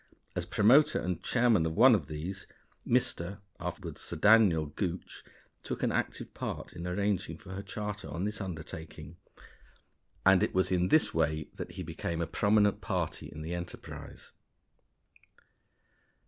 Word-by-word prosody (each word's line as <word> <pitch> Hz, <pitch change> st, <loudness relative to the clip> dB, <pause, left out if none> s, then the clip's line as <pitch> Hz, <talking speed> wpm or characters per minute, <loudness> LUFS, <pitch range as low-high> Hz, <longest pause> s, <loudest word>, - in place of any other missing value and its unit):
As -, -, -2 dB
promoter 125 Hz, +9 st, +5 dB
and 90 Hz, -2 st, -2 dB
chairman 120 Hz, -7 st, +3 dB
of 80 Hz, -, -4 dB
one 125 Hz, +4 st, +8 dB
of 90 Hz, -10 st, +1 dB
these, 85 Hz, +6 st, -6 dB, 0.4 s
Mr. 100 Hz, -6 st, 0 dB, 0.2 s
(afterward -, -, -5 dB
Sir -, -, -6 dB
Daniel) 100 Hz, -3 st, +5 dB
Gooch 90 Hz, +4 st, -5 dB, 0.4 s
took -, -, -5 dB
an -, -, +2 dB
active -, -, -2 dB
part -, -, -5 dB
in 85 Hz, +1 st, -6 dB
arranging 100 Hz, +1 st, -1 dB
for 100 Hz, -3 st, -12 dB
her 95 Hz, +1 st, -4 dB
charter 105 Hz, 0 st, -5 dB
on 85 Hz, -, -3 dB
this 105 Hz, +1 st, -2 dB
undertaking, 80 Hz, -3 st, -7 dB, 1.1 s
and 95 Hz, -1 st, +6 dB
it -, -, 0 dB
was 95 Hz, 0 st, +2 dB
in 90 Hz, -1 st, +2 dB
this 155 Hz, +10 st, +4 dB
way 80 Hz, -1 st, 0 dB
that -, -, -7 dB
he 90 Hz, -, -5 dB
became 85 Hz, 0 st, -4 dB
a 85 Hz, -, 0 dB
prominent 105 Hz, +2 st, +2 dB
party -, -, -2 dB
in 75 Hz, 0 st, -8 dB
the 80 Hz, +2 st, -4 dB
enterprise. 90 Hz, 0 st, -8 dB
95 Hz, 145 wpm, -31 LUFS, 80-105 Hz, 1.1 s, one